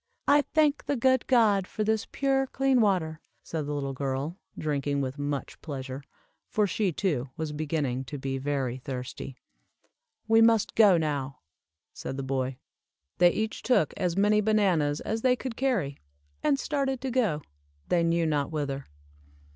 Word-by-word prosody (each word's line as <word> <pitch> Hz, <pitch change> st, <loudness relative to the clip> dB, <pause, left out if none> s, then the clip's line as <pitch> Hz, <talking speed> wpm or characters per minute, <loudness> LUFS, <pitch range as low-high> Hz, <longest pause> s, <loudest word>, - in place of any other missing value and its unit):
"I 290 Hz, +1 st, +6 dB
thank 300 Hz, -2 st, +3 dB
the 285 Hz, -, +1 dB
good 260 Hz, 0 st, +2 dB
God 210 Hz, -7 st, +4 dB
for 215 Hz, -, -3 dB
this 220 Hz, 0 st, 0 dB
pure, 270 Hz, -1 st, +1 dB
clear 270 Hz, -1 st, +2 dB
water," 175 Hz, -7 st, +1 dB, 0.2 s
said 155 Hz, -3 st, -4 dB
the 150 Hz, -, -2 dB
little 140 Hz, -1 st, -2 dB
girl, 135 Hz, +4 st, -2 dB, 0.2 s
drinking 145 Hz, -2 st, -1 dB
with 135 Hz, +1 st, -4 dB
much 145 Hz, -1 st, -4 dB
pleasure, 135 Hz, -2 st, -6 dB, 0.5 s
for 210 Hz, -, +1 dB
she, 200 Hz, -1 st, 0 dB
too, 145 Hz, -7 st, -1 dB
was 160 Hz, -1 st, -3 dB
beginning 145 Hz, -4 st, -2 dB
to 145 Hz, -, -6 dB
be 135 Hz, 0 st, -3 dB
very 135 Hz, -3 st, -1 dB
thirsty. 130 Hz, 0 st, -6 dB, 0.9 s
"We 225 Hz, 0 st, +5 dB
must 225 Hz, -2 st, +4 dB
go 205 Hz, -5 st, +6 dB
now," 145 Hz, -4 st, -2 dB, 0.5 s
said 135 Hz, -, -6 dB
the 135 Hz, -, -3 dB
boy. 130 Hz, -1 st, -2 dB, 0.6 s
They 175 Hz, 0 st, +7 dB
each 220 Hz, +5 st, -2 dB
took 245 Hz, -, +2 dB
as 180 Hz, -1 st, -1 dB
many 210 Hz, +1 st, +4 dB
bananas 185 Hz, -9 st, +2 dB
as 220 Hz, +1 st, -2 dB
they 250 Hz, 0 st, +4 dB
could 255 Hz, -2 st, -5 dB
carry, 215 Hz, -, 0 dB, 0.4 s
and 290 Hz, -2 st, +2 dB
started 270 Hz, -2 st, -1 dB
to 265 Hz, -1 st, -2 dB
go, 215 Hz, -, +1 dB, 0.5 s
they 175 Hz, -, +3 dB
knew 170 Hz, 0 st, +2 dB
not 145 Hz, -3 st, 0 dB
whither. 140 Hz, -3 st, -3 dB
165 Hz, 160 wpm, -28 LUFS, 140-225 Hz, 0.9 s, They